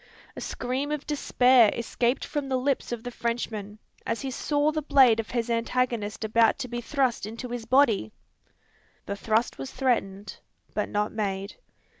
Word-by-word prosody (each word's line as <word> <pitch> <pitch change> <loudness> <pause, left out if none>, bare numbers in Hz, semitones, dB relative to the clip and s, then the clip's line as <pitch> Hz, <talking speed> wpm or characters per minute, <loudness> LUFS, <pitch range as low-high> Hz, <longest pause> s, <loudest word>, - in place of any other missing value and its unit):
A - - -7
scream 265 +4 -3
of 300 -1 -3
despair 255 -5 +4
escaped 235 +2 -1
from 290 -2 -3
the 260 - +1
lips 265 0 -1
of 235 -2 -4
the 245 - -5
Frenchman, 225 -3 -3 0.3
as 230 - -2
he 270 -1 -3
saw 290 +3 +1
the 310 0 -2
blade 260 -6 +5
of 225 - -3
his 235 -1 -1
antagonist 230 -2 -1
about 225 +1 +3
to 275 - -4
be 240 0 -4
thrust 255 -5 0
into 230 +3 -7
his 240 -2 -5
body! 230 - +3 0.9
The 200 - -3
thrust 220 - 0
was 135 - -5
threatened, 205 -6 -1 0.3
but 210 - -1
not 210 0 -1
made. 200 -2 -3
235 Hz, 165 wpm, -27 LUFS, 220-260 Hz, 0.9 s, blade